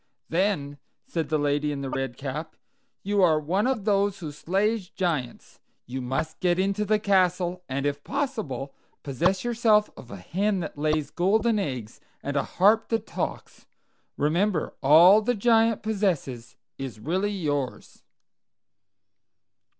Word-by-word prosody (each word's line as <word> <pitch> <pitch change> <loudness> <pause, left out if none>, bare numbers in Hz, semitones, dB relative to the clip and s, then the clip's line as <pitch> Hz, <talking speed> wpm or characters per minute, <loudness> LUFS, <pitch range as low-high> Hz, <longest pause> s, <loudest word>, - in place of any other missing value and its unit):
"Then," 165 -6 0 0.3
said 165 -3 -3
the 155 - +2
lady 145 0 0
in 140 -1 -4
the 135 - -4
red 135 -2 -3
cap, 150 +4 -5 0.5
"you 205 0 +1
are 160 -4 +4
one 185 +9 0
of 250 -7 -1
those 200 -1 +2
who 160 -5 -6
slay 195 +9 0
giants. 170 - -4 0.3
You 130 +2 -5
must 135 +6 -3
get 175 -1 +2
into 200 +2 0
the 215 +1 +3
castle, 185 -3 +1
and 135 +2 -2
if 145 0 -2
possible 215 - -3 0.3
possess 170 +8 0
yourself 225 -3 +3
of 120 - -12
a - - -7
hen 190 - -1
that 160 - -6
lays 155 0 -1
golden 215 +5 +2
eggs, 125 - -5 0.2
and 140 +1 -3
a 140 - +3 0.2
harp 215 +4 +4
that 225 -1 -1
talks. - - -5 0.5
Remember, 170 +4 0
all 170 +9 +7
the 245 +3 0
Giant 225 0 +3
possesses 170 - -2 0.2
is 130 -5 -6
really 185 - -1
yours." 145 -9 -3
175 Hz, 140 wpm, -26 LUFS, 145-205 Hz, 0.5 s, all